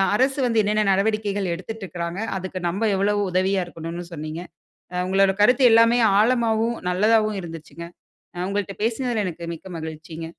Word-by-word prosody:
அரசு 270 +4 +2
வந்து 225 -2 +3
என்னென்ன 210 +1 +1
நடவடிக்கைகள் 200 -1 0
எடுத்துட்டுருக்றாங்க. 180 -3 -6 0.2
அதுக்கு 185 0 -5
நம்ம 210 +6 0
எவ்ளோ 200 +2 +2 0.2
உதவியா 185 +1 +1
இருக்கணுன்னு 170 +1 -7
சொன்னீங்க. 155 +1 -5 0.5
அ - - -4
உங்களோட 195 0 +3
கருத்து 250 +5 +5
எல்லாமே 230 +1 +5 0.2
ஆழமாவும், 230 0 +2
நல்லதாவும் 215 +2 +2
இருந்துச்சுங்க. 165 0 -9 0.5
அ - - -9
உங்கள்ட 200 -1 -2
பேசுனதுல 230 -1 0
எனக்கு 170 -1 -7
மிக்க 165 - -13
மகிழ்ச்சிங்க. 160 0 -7
195 Hz, 140 wpm, -23 LUFS, 175-220 Hz, 0.5 s, கருத்து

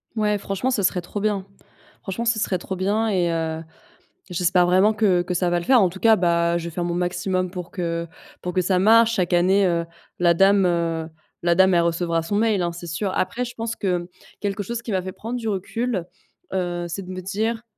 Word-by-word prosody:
Ouais, 210 -1 +1
franchement, 200 +6 -2
ce 235 - 0
serait 185 -1 +1
trop 175 +4 -6
bien. 205 -2 -1 0.6
Franchement, 195 +4 -4
ce 230 -1 +2
serait 195 -3 0
trop 190 +2 -5
bien 210 +4 +1
et 180 -4 +1
heu, 160 -1 -2 0.7
j'espère 180 0 +2
vraiment 190 +4 +4
que 200 -5 +3
que 180 - -3
ça 180 0 +1
va 175 0 +1
le 170 - -7
faire. 255 -3 +5
En 185 - +4
tout 190 +2 -10
cas, 225 +1 +6
bah, 170 -2 +2
je 170 - -5
vais - - -3
faire 175 +1 -2
mon 175 - -1
maximum 180 +1 -1
pour 180 -2 -7
que 170 -2 -3 0.3
pour 180 - -4
que 185 - +2
ça 185 +1 +1
marche. 225 +3 +5
Chaque 180 -3 0
année, 190 +3 +4
heu, 170 -2 +1 0.3
la 175 -1 +4
dame, 195 +2 +4
heu, 165 -2 0 0.3
la 170 0 +3
dame, 190 +1 +5
elle 170 - +4
recevra 170 0 0
son 165 +5 -3
mail 215 -3 +2
hein, 175 -1 0
c'est 175 +1 -9
sûr. 180 +5 -2
Après 240 +6 -1
je 240 - -8
pense 230 0 -3
que, 185 -3 0
mmh, 175 0 -7 0.3
quelque 205 0 -2
chose 235 +4 -4
chose 235 - -6
qui 230 - -5
m'a 185 - +1
fait 185 +1 -6
prendre 230 +6 -5
du 225 -2 -3
recul, 205 0 -2 0.5
heu, 175 -2 -2
c'est 170 +3 -5
de 185 - -10
me 185 0 -5
dire, 220 +5 -2
185 Hz, 235 wpm, -23 LUFS, 175-210 Hz, 0.7 s, cas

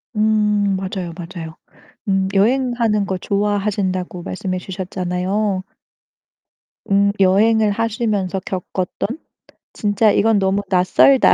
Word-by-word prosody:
음 210 -2 +2
맞아요, 185 -2 -4
맞아요. 165 -2 -8 0.5
음 190 -1 +1
여행하는 230 -1 +2
거 190 -1 -2
좋아하신다고 200 -2 -1
말씀해 185 0 -3
주셨잖아요. 185 +2 -2 1.3
음 200 0 +4
여행을 210 +3 +4
하시면서 210 -4 -1
겪었던 185 0 -3 0.7
'진짜 210 +1 +2
이건 220 0 +3
너무 195 +1 +1
낯설다. 190 +8 +5
200 Hz, 250 characters per minute, -19 LUFS, 185-210 Hz, 1.3 s, 낯설다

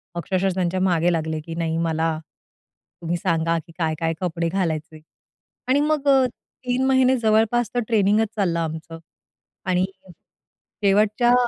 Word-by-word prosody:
अक्षरशः 190 +2 0
त्यांच्या 185 0 0
मागे 175 -2 +2
लागले, 160 -1 -2
की 165 +1 -8
"नाही, 165 -1 -1
मला 165 -1 0 0.8
तुम्ही 170 +1 -1
सांगा 165 -1 0
की 165 - -15
काय-काय 165 -1 -1
कपडे 170 -2 -1
घालायचे?" 160 -4 -2 0.7
आणि 265 +2 +3
मग 300 -1 0
अ, 270 -2 +5 0.4
3 250 +1 +1
महिने 260 -1 +4
जवळपास 225 +1 +2
तो 245 - +1
ट्रेनिंगचं 215 -1 +3
चाललं 180 -5 0
आमचं. 160 0 -5 0.7
आणि 185 -1 +2 0.2
हं. 180 - -12 0.7
शेवटच्या 215 +4 +3
180 Hz, 135 wpm, -23 LUFS, 165-220 Hz, 0.8 s, अ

